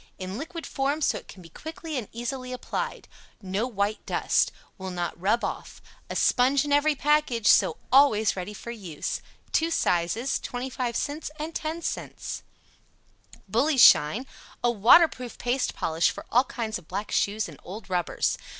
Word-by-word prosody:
In 190 +2 -5
liquid 325 +2 -6
form 280 +2 -1
so - - +1
it - - -19
can 185 - -12
be 165 - -13
quickly 320 - -7
and 240 -6 -3
easily 250 +2 -5
applied. 250 -1 -4 0.3
No 200 +3 -2
white 210 -2 -1
dust. - - +2 0.3
Will 190 0 -5
not 175 -1 -3
rub 215 +5 +2
off. - - -5 0.3
A - - -4
sponge 265 +3 +3
in 290 - -3
every 290 +1 +3
package, 295 -6 +1
so - - +5
always 245 -6 +5
READY 190 +3 -5
for 235 - -7
use. 185 -10 -5 0.3
Two 325 +1 +2
sizes, 225 - +1
25c 255 +4 -3
and 315 +1 -5
10c. 320 +2 -4 1.1
"BULLY 265 +9 +2
SHINE." 220 - +6 0.4
A 240 - +4
waterproof 245 - +4
paste 250 +2 -1
polish 165 +1 +1
for - - -7
all 250 +3 +5
kinds 225 -5 -4
of 165 - -20
black 200 +3 -4
shoes 210 +2 +1
and 150 -5 -12
old 195 +2 -8
rubbers. 180 -2 0
240 Hz, 155 wpm, -26 LUFS, 200-280 Hz, 1.1 s, SHINE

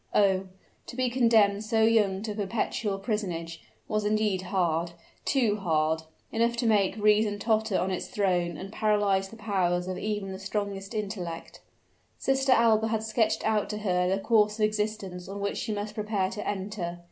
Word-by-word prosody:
Oh! 195 -2 +3 0.4
to - - -8
be 255 -1 0
condemned 220 -5 +4
so 220 0 +2
young 210 -3 +3
to 215 -1 -3
perpetual 205 0 -2
prisonage, 180 -6 -3 0.3
was 215 0 0
indeed 210 -2 +1
hard, 170 -2 0 0.3
too 235 -7 +2
hard 160 -4 +1 0.3
enough 235 +1 +1
to 235 - -1
make 210 -3 +3
reason 210 0 +3
totter 220 -1 +1
on 190 +1 -1
its 185 - -3
throne 180 -5 0
and 195 +2 -8
paralyze 205 -3 +1
the 225 - -11
powers 185 -5 0
of 185 -1 -3
even 210 -2 -3
the 190 - -6
strongest 200 +1 -4
intellect. 195 -6 -5 0.6
Sister 270 0 +1
Alba 225 -2 +4
had 220 -1 -1
sketched 220 0 0
out 215 -1 +1
to 210 - -3
her 180 -4 +1
the 190 - +2
course 210 0 +2
of 215 - +4
existence 210 -4 -3
on 200 +1 -5
which 200 0 -2
she - - -3
must 210 0 -3
prepare 210 -3 -1
to 210 - -5
enter. 190 -3 -4
205 Hz, 170 wpm, -28 LUFS, 190-220 Hz, 0.6 s, condemned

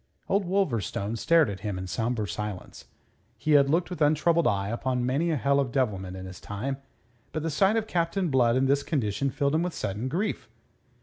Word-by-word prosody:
Old 200 0 +1
Wolverstone 115 - -1
stared 165 +7 +4
at 100 -1 -5
him 100 -1 -3
in 95 - -4
sombre 110 +3 -1
silence. 105 -2 -6 0.5
He 155 - -1
had 140 -2 +6
looked 170 +4 +1
with 180 - -6
untroubled 160 +3 +3
eye 100 0 0
upon 125 +2 -1
many 140 +7 +1
a 160 - +1
hell 140 +1 +2
of 135 -3 0
devilment 95 -8 -1
in 95 - -7
his 95 -1 -10
time, 130 +7 -4 0.5
but 155 - -3
the 165 - -1
sight 195 +8 +3
of 225 -1 +1
Captain 175 -1 0
Blood 125 -4 +3
in 130 +1 +3
this 140 +1 +3
condition 135 -3 -1
filled 140 +2 0
him 160 - +2
with 175 -1 -2
sudden 105 +4 -3
grief. 190 +10 -2
135 Hz, 200 wpm, -27 LUFS, 105-165 Hz, 0.5 s, had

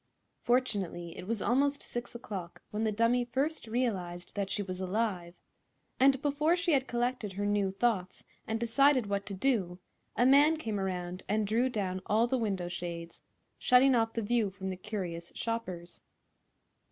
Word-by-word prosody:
Fortunately 200 -9 0
it 185 - -8
was 225 -2 -1
almost 280 +3 +2
six 240 0 -6
o'clock 200 -8 -7
when 215 +1 -1
the 215 - +1
dummy 230 +3 +2
first 270 +3 -2
realized 190 -7 -2
that 200 -1 -2
she 205 +2 -1
was 185 -1 -5
alive, 185 -3 -1 0.6
and 270 0 +5
before 300 +3 +2
she 345 -1 0
had 270 -3 +2
collected 240 -4 -1
her 205 +2 -2
new 205 -1 +2
thoughts 195 -2 -1 0.2
and 225 0 -1
decided 255 +2 +4
what 200 0 -2
to 200 - -4
do 190 -6 0 0.4
a 245 - +3
man 290 +4 +6
came 220 -9 -3
around 180 -1 -3
and 210 +1 +2
drew 230 +5 +2
down 190 -5 -2
all 220 +3 +3
the 255 +1 0
window 195 -6 -1
shades, 170 -1 -6 0.4
shutting 260 +2 +5
off 225 -2 +2
the 230 - -2
view 225 -1 +1
from 190 0 -5
the - - -4
curious 180 -4 -5
shoppers. 185 -7 -4
215 Hz, 165 wpm, -31 LUFS, 185-245 Hz, 0.6 s, man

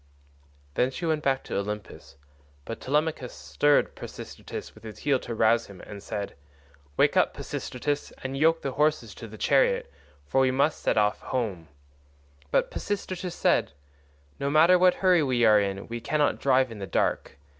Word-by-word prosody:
Then 125 - +2
she 170 +6 -5
went 155 -2 0
back 135 -1 +1
to - - -6
Olympus; 105 -7 -6 0.5
but 115 - -6
Telemachus 150 -2 -1
stirred 145 -1 +2
Pisistratus - - -8
with - - -17
his 110 -2 -9
heel 140 -3 +3
to 120 - -6
rouse 115 +1 +3
him, 100 -3 -12
and 100 -1 -9
said, 100 -1 -5 0.6
"Wake - - +4
up - - +3
Pisistratus, 145 +3 -4
and 135 0 -4
yoke 160 +4 +3
the 135 - -2
horses 150 -6 0
to 115 - -9
the 110 0 -11
chariot, 70 - +2 0.3
for 135 - +2
we 130 - +4
must 140 +4 +1
set - - 0
off 105 -1 +2
home."129 105 -11 -3 0.8
But - - +1
Pisistratus 185 -3 -4
said, - - +2 0.7
"No 140 - -1
matter 165 +5 +6
what 180 0 +5
hurry 180 -3 +6
we 125 -4 +2
are 105 -1 +6
in 100 0 -3
we 120 0 -5
cannot 150 +2 +1
drive 130 -2 +3
in 110 - -8
the 95 - -5
dark. 70 - -1
130 Hz, 170 wpm, -27 LUFS, 110-150 Hz, 0.8 s, matter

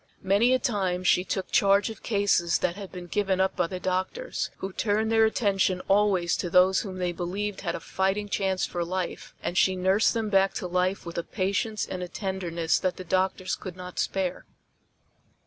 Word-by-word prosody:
Many 200 +6 +3
a - - +4
time 190 -7 -1
she 180 0 +4
took 190 0 -3
charge 200 +2 +4
of 220 - -11
cases 200 -6 +2
that 175 - -1
had 200 -2 -8
been 180 -1 -8
given 190 +1 0
up 190 0 +1
by 180 -2 +1
the 185 +1 -5
doctors, 185 - -2
who 190 0 -5
turned 220 +2 0
their 225 0 +5
attention 195 -4 +1
always 195 -4 +3
to 175 - -3
those 185 +2 +5
whom 190 -3 -6
they 180 -1 -1
believed 190 +4 -3
had - - -2
a - - -4
fighting 195 +2 -1
chance 190 -2 0
for 175 -1 -3
life, 185 +1 -4
and 175 - -2
she 190 - +3
nursed 190 +5 +2
them 225 -2 -1
back 195 -1 +3
to - - -3
life 180 +2 0
with 170 0 -4
a - - -3
patience 200 +4 -1
and 185 - -5
a 180 - -4
tenderness 175 -3 -1
that 185 -1 -1
the 185 - -6
doctors 185 +1 0
could 185 -2 -8
not 180 0 -8
spare. 185 -2 -2
190 Hz, 200 wpm, -27 LUFS, 180-200 Hz, -, their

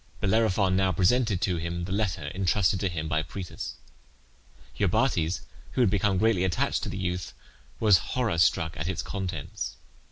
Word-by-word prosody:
Bellerophon 100 -2 +2
now 95 0 +3
presented 100 +3 +2
to 95 -4 +1
him 85 +1 -3
the 95 - -6
letter 95 -6 -1
intrusted 95 +1 +1
to 95 - 0
him 80 -3 -4
by 80 0 +1
Proetus. 90 +3 -6 1.0
Iobates, 85 +3 +1 0.3
who 130 - +1
had 110 -6 +4
become 100 -1 +2
greatly 110 -2 +3
attached 90 -3 0
to - - -3
the - - -5
youth, 90 -2 -3 0.5
was 105 -4 +6 0.2
horror 115 -10 +1
struck 80 -1 +2
at 80 +3 -2
its 95 - -2
contents. 95 -1 -4
95 Hz, 160 wpm, -27 LUFS, 85-100 Hz, 1.0 s, was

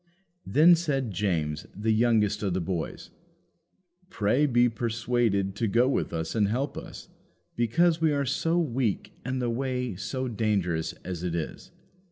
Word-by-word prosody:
Then 160 +4 +6
said 140 -8 0
James, 80 -6 -1
the 110 +2 0
youngest 110 -2 +2
of 95 -4 -1
the - - +1
boys, 85 -1 -4 1.0
"Pray 125 - +2
be 120 -2 +4
persuaded 115 -3 0
to 115 - 0
go 120 +5 +3
with 135 - 0
us 80 -1 -3
and 105 -3 +2
help 130 +7 -2
us, - - -9 0.5
because 160 +9 +2
we 160 -1 +3
are 140 -1 0
so 165 +5 0
weak 130 - -1
and 130 +1 -2
the 120 -2 0
way 125 -3 -2
so 130 +8 -3
dangerous 100 -8 -1
as 90 -2 -4
it 90 -2 -2
is." 80 -2 -5
115 Hz, 155 wpm, -27 LUFS, 95-130 Hz, 1.0 s, Then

